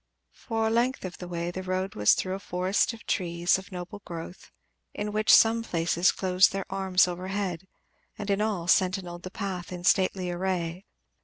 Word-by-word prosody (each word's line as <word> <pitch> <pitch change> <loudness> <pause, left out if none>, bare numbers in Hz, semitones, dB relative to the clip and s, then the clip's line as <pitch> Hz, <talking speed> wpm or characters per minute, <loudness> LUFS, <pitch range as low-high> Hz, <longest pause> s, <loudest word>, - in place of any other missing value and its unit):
For 225 -2 -2
a 220 - +1
length 240 0 +1
of 180 0 -8
way 175 -1 -4
the 185 - -5
road 185 +1 -2
was 105 0 +4
through 185 - -2
a 195 - -4
forest 185 +2 0
of 230 -1 -12
trees 175 0 +1
of 190 +2 -13
noble 185 +3 -7
growth, 170 +2 -8 0.5
which 210 +1 -2
in - - +11
some 225 +1 +5
places 170 -3 +1
closed 185 -1 +3
their 195 0 -3
arms 190 -2 +3
overhead 185 0 -4 0.5
and 205 -1 -3
in 200 +1 +1
all 210 -6 -1
sentinelled 180 -2 +1
the 185 - -7
path 190 -3 -5
in 180 -1 -6
stately 185 -1 +2
array. 180 0 -2
185 Hz, 175 wpm, -27 LUFS, 175-200 Hz, 0.5 s, in